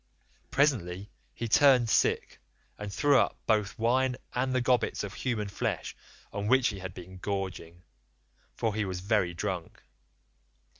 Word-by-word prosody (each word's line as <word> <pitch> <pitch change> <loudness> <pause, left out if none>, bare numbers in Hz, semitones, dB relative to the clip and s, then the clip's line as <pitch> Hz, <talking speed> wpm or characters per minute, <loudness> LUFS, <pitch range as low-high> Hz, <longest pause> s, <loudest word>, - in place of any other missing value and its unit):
Presently 105 - +1 0.2
he 120 - -4
turned 130 0 +5
sick, 110 - +1 0.4
and 105 -1 -5
threw 140 +7 +4
up - - +1
both 105 -3 +1
wine 125 +3 +2 0.2
and 130 +1 0
the 130 - +2
gobbets 125 0 +1
of 100 -1 -5
human 110 -5 -2
flesh 100 - -3 0.4
on 100 0 -3
which 130 +2 +4
he 100 -3 -6
had 95 -1 -7
been 90 +1 -10
gorging, 90 -3 -4 0.7
for 110 -2 -1
he 110 0 0
was 95 -2 -3
very 95 -3 +1
drunk. 90 -2 -4
105 Hz, 145 wpm, -29 LUFS, 95-125 Hz, 0.7 s, turned